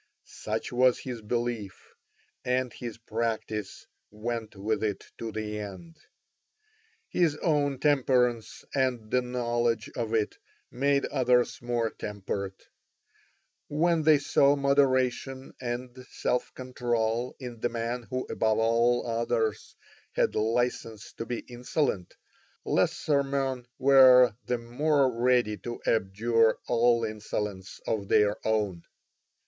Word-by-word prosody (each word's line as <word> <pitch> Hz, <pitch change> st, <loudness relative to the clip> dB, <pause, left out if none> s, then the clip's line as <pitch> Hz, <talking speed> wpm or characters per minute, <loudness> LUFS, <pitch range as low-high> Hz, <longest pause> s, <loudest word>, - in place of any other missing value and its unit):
Such -, -, -4 dB
was 125 Hz, 0 st, +4 dB
his 125 Hz, -3 st, -6 dB
belief, 115 Hz, -3 st, -4 dB, 0.5 s
and 125 Hz, 0 st, 0 dB
his 120 Hz, -3 st, -7 dB
practice 110 Hz, -2 st, -3 dB, 0.2 s
went 110 Hz, 0 st, -5 dB
with 105 Hz, +3 st, -1 dB
it 105 Hz, -2 st, -2 dB
to 115 Hz, -1 st, -4 dB
the 105 Hz, 0 st, -4 dB
end. 105 Hz, -, -9 dB, 1.1 s
His 160 Hz, -4 st, +1 dB
own 145 Hz, -4 st, +1 dB
temperance 125 Hz, -5 st, +1 dB
and 125 Hz, -5 st, 0 dB
the 125 Hz, -, +3 dB
knowledge 120 Hz, -2 st, -1 dB
of 115 Hz, -2 st, -2 dB
it 110 Hz, -2 st, -1 dB, 0.3 s
made 140 Hz, +2 st, +1 dB
others 125 Hz, -2 st, +1 dB
more 120 Hz, -2 st, -1 dB
temperate. 100 Hz, -1 st, -5 dB, 1.0 s
When 165 Hz, +2 st, +2 dB
they 155 Hz, -1 st, +6 dB
saw 140 Hz, 0 st, +3 dB
moderation 135 Hz, -1 st, +1 dB
and 120 Hz, 0 st, -4 dB
self 125 Hz, -, -1 dB
control 120 Hz, -2 st, -1 dB
in 125 Hz, -3 st, -7 dB
the 120 Hz, -, 0 dB
man 120 Hz, +1 st, -3 dB
who 130 Hz, 0 st, -2 dB
above 110 Hz, -1 st, 0 dB
all 115 Hz, +2 st, +2 dB
others 115 Hz, -2 st, -1 dB, 0.4 s
had -, -, +1 dB
licence 115 Hz, -1 st, -1 dB
to 115 Hz, -, -6 dB
be 120 Hz, 0 st, -3 dB
insolent, 120 Hz, -, -2 dB, 0.5 s
lesser 145 Hz, -2 st, +2 dB
men 135 Hz, -3 st, -2 dB
were 130 Hz, -3 st, +7 dB
the 125 Hz, -, 0 dB
more 135 Hz, +3 st, +1 dB
ready 120 Hz, -3 st, +2 dB
to 120 Hz, +2 st, -6 dB
abjure 115 Hz, +2 st, +2 dB
all 120 Hz, 0 st, +3 dB
insolence 105 Hz, -3 st, -5 dB
of 100 Hz, -3 st, -2 dB
their 105 Hz, +1 st, +4 dB
own. 105 Hz, -6 st, 0 dB
120 Hz, 115 wpm, -28 LUFS, 110-130 Hz, 1.1 s, were